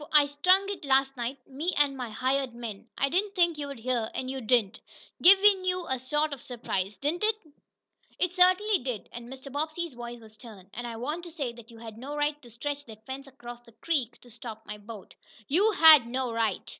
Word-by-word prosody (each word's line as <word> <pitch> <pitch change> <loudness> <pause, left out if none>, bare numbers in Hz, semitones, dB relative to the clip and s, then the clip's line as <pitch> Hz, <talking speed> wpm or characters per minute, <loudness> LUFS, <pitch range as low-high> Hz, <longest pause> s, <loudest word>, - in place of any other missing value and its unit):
I 300 -1 +7
strung 365 +7 +3
it 400 -4 -5
last 270 -1 +2
night 245 +2 -4
me 300 +7 -2
and 285 -2 +3
my 250 -3 -5
hired 260 +2 -1
men. 225 -4 -7
I 275 - +2
didn't 390 +7 0
think 345 -4 +2
you'd 280 -2 -5
hear, 235 -1 -1
and 260 0 -3
you 265 0 -5
didn't. 220 -3 +2 0.4
Give 390 +3 +9
you 370 -3 +3
a 260 -1 -1
sort 295 +4 0
of 270 - -8
surprise, 210 -5 -3
didn't 315 +7 -1
it?" 435 0 +4 0.8
"It 360 -1 0
certainly 370 +3 +4
did," 245 -5 -5
and 240 +1 -9
Mr. 265 +1 -9
Bobbsey's 310 +2 -3
voice 240 0 -7
was 220 -1 -14
stern. 210 -4 -14
"And 240 +1 -5
I 230 - -6
want 295 +9 -4
to - - -8
say 280 -7 -4
that 235 0 -14
you 230 - -14
had 225 -1 -10
no 280 +4 -6
right 295 0 0
to 245 - -15
stretch 285 +5 -4
that 220 -1 -13
fence 270 +1 -7
across 240 -3 -11
the 235 -1 -20
creek 255 -5 -2
to 245 - -16
stop 225 -2 -9
my 210 0 -7
boat. 205 -1 -11 0.3
You 380 +10 +3
had 310 - +8
no 255 0 -2
right!" 230 -1 -1
265 Hz, 215 wpm, -28 LUFS, 235-305 Hz, 0.8 s, Give